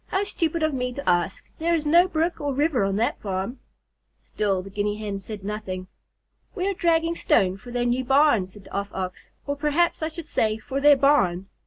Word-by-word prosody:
"How 385 - 0
stupid 335 -5 -1
of 310 -1 +1
me 250 -1 -2
to 280 - -7
ask. 175 +1 +1
There 335 +1 +2
is 315 -2 -2
no 340 +5 +5
brook 335 -1 -1
or 285 -2 -1
river 290 -5 +2
on 195 0 0
that 225 +4 0
farm." 195 +5 -3 0.6
Still 195 -3 -1
the 195 - -10
Guinea 205 +1 -1
Hen 205 -2 -4
said 200 +1 -8
nothing. 195 -3 -4 0.7
"We 375 -1 -1
are 400 - +1
dragging 335 -1 +1
stone 185 - +2
for 215 +6 -12
their 240 0 -1
new 245 +2 +1
barn," 265 -7 +4
said 195 +1 -14
the - - -15
Off 200 0 -2
Ox. 185 -1 -5 0.2
"Or 285 - -2
perhaps 300 +4 +1
I 315 - 0
should 325 0 -7
say 215 -7 0
for 265 +5 -4
their 290 0 +7
barn. 195 -10 +2
250 Hz, 210 wpm, -24 LUFS, 200-315 Hz, 0.7 s, their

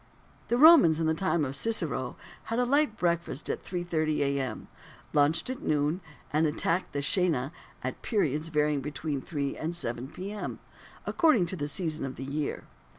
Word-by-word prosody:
The 240 - +1
Romans 270 - +8
in 165 - +1
the 160 - +3
time 165 -2 +1
of 135 0 -4
Cicero 155 - 0 0.3
had 230 - -2
a 250 - +3
light 275 -3 +2
breakfast 170 -4 -1
at - - -5
3.30 165 -4 -1
A.M., 140 -2 -1 0.5
lunched 150 +2 +3
at 260 - -6
noon, 150 +4 0 0.3
and 155 +1 +3
attacked 165 +4 -1
the 140 0 -2
coena 150 -5 +2 0.3
at - - -4
periods 160 - 0
varying 150 -2 +1
between 145 0 -3
3 140 -3 -3
and 165 +2 -3
7 120 -6 -3
P.M. 200 +7 -6 0.5
according 310 - +3
to 175 - -5
the 145 -4 -3
season 155 -1 -2
of 135 -1 -4
the 135 - -6
year. 145 +2 -3
160 Hz, 165 wpm, -29 LUFS, 145-180 Hz, 0.5 s, Romans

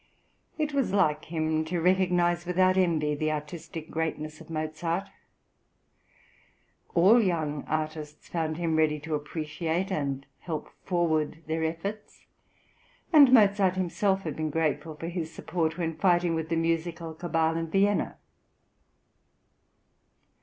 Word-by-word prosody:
" - - -43
It 305 -2 -1
was 275 -7 0
like 150 -6 +2
him 155 -1 0
to 175 +2 -2
recognise 175 -1 +2
without 185 +1 +3
envy 165 -5 +2
the 155 +1 -1
artistic 155 +1 -6
greatness 155 -1 -3
of 160 - -14
Mozart; 165 +4 -2 1.9
all 200 +8 +6
young 155 -7 -1
artists 155 -1 -4
found 160 -2 -2
him 165 -2 0
ready 155 -1 +2
to 160 +1 -5
appreciate 160 +4 -2
and 140 -4 -2
help 160 -4 -5 0.2
forward 160 -3 0
their 160 +1 -1
efforts, 195 +7 -5 0.9
and 285 -5 +8
Mozart 200 -5 +5
himself 190 +2 0
had 155 - -4
been 155 0 -2
grateful 155 0 -1
for 165 +2 -6
his 170 -2 -4
support 160 0 -2
when 165 -2 -2
fighting 175 0 +2
with 160 -1 -2
the 165 - +1
musical 165 0 -1
cabal 165 -1 0
in 165 0 -2
Vienna. 200 +3 +1
165 Hz, 130 wpm, -28 LUFS, 155-180 Hz, 1.9 s, and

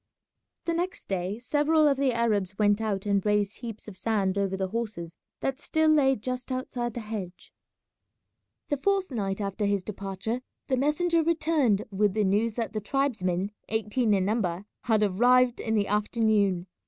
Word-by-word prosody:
The 335 - 0
next 360 +3 -3
day 190 +1 -2
several 295 +5 +2
of 280 - +4
the 270 -1 +2
Arabs 210 -5 0
went 205 0 +3
out 205 -3 -2
and 200 -2 +1
raised 210 -1 +1
heaps 225 -3 -7
of 190 -3 -9
sand 200 -4 0
over 195 -1 0
the 190 -1 -2
horses 205 -7 -4 0.3
that 270 +1 -2
still 315 +1 +1
lay 270 -3 +4
just 255 +3 -5
outside 245 -2 -3
the 240 - -3
hedge. 205 -5 -7 1.2
The 290 - +1
fourth 390 +3 0
night 195 -5 -2
after 200 +1 -2
his 200 -2 +1
departure 200 +4 -4 0.3
the 260 - +3
messenger 325 +5 +2
returned 310 -10 +2
with 200 0 +1
the 215 - +2
news 210 +3 +1
that 230 -2 -3
the 215 - -2
tribesmen, 205 -7 -1 0.2
eighteen 220 +2 +1
in 190 -1 +1
number, 195 -3 -1 0.2
had 220 -3 +3
arrived 245 +5 +4
in 220 -1 -1
the 205 -1 +2
afternoon. 210 -3 +1
220 Hz, 165 wpm, -27 LUFS, 200-255 Hz, 1.2 s, of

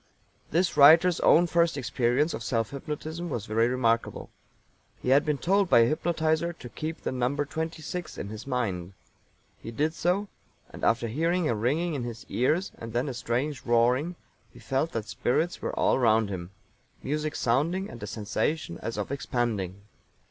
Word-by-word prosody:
This 175 +3 +1
writer's 160 +4 +7
own 170 +3 +5
first 170 -2 +2
experience 125 +4 +1
of - - -5
self 115 -4 -1
hypnotism 155 +4 -5
was 115 -7 -3
very 115 +2 +2
remarkable. 115 -2 0 0.7
He - - -3
had 140 +2 +5
been 150 -2 0
told 195 +4 +2
by 120 - +7
a - - +6
hypnotizer 160 +3 0
to 125 -7 -11
keep 155 +6 -5
the - - -2
number 130 +3 0
twenty 160 +2 -4
six 180 0 -5
in 100 - -5
his 110 +4 -8
mind. 100 -9 -2 0.7
He - - -7
did 150 +7 0
so, 180 +5 0 0.4
and - - -11
after 115 +1 +2
hearing 165 +7 0
a - - +1
ringing 145 +11 0
in 135 -4 -3
his 115 -1 -7
ears 155 +10 +1
and 115 -1 -7
then 125 +4 0
a - - -4
strange 125 +4 -2
roaring 125 +8 +2 0.4
he - - -17
felt 135 +5 -1
that 115 -2 -2
spirits 125 +10 -1
were - - -4
all - - +3
round 110 -3 +3
him 90 -2 -5 0.5
music 150 +2 -2
sounding 165 +11 +1
and 120 - -10
a 105 - -5
sensation 110 - -2
as 115 0 -5
of 105 +4 -3
expanding. 110 -8 -2
135 Hz, 175 wpm, -27 LUFS, 115-160 Hz, 0.7 s, writer's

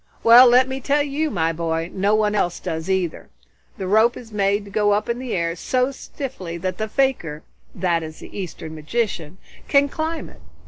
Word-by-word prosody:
Well, 240 +2 +9
let 250 +2 +5
me 265 0 -4
tell 290 +2 +2
you, 295 +2 -1
my 165 - 0
boy, 165 0 -2
no 200 +2 +2
one 210 -1 +2
else 175 -4 0
does 160 +3 -4
either. 185 -3 -1 0.5
The 190 - -4
rope 220 +5 +3
is 230 -2 -11
made 200 0 +1
to 200 - -12
go 205 0 +2
up 210 - 0
in 235 +1 -2
the 255 -2 -3
air, 170 -1 -1
so 255 +8 0
stiffly 250 -11 -7
that 185 +4 -4
the 215 - -1
fakir 215 - 0 0.3
that 175 -2 0
is, 155 -1 -8
the - - -12
Eastern 170 -4 -6
magician 165 0 -3 0.3
can 280 0 +4
climb 320 +2 -3
it. - - -17
205 Hz, 195 wpm, -22 LUFS, 170-250 Hz, 0.5 s, Well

